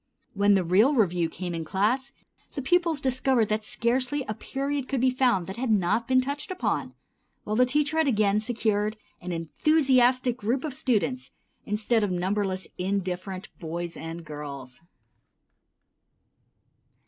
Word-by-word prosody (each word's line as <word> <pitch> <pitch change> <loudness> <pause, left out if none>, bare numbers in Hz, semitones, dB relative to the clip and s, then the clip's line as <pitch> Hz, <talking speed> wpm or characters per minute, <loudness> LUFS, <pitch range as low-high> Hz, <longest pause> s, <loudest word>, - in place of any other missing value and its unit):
When 200 0 +4
the 190 - +2
real 205 - +4
review 175 -7 +2
came 175 +1 -5
in 165 -1 -3
class, 220 - 0 0.4
the 275 - -3
pupils 335 0 +2
discovered 260 -3 +1
that 215 0 0
scarcely 255 +6 0
a 215 - -2
period 275 +4 -3
could 270 - -1
be 255 +1 +3
found 250 -8 +2
that 190 +4 -7
had 255 0 -2
not 215 +3 +2
been 255 0 +4
touched 280 +6 -4
upon, 370 -1 -2 0.5
while 215 - -2
the 250 +2 +4
teacher 295 +4 +1
had 320 - +3
again 210 -4 +3
secured 215 -2 -1 0.2
an 180 0 -5
enthusiastic 255 - +2
group 245 +4 -1
of 305 -4 -3
students 255 0 -1 0.4
instead 215 +2 +1
of 205 - +1
numberless 185 +1 -1
indifferent 190 0 -3
boys 170 0 -5
and 165 +1 -7
girls. 140 -4 -8
215 Hz, 145 wpm, -26 LUFS, 185-260 Hz, 0.5 s, When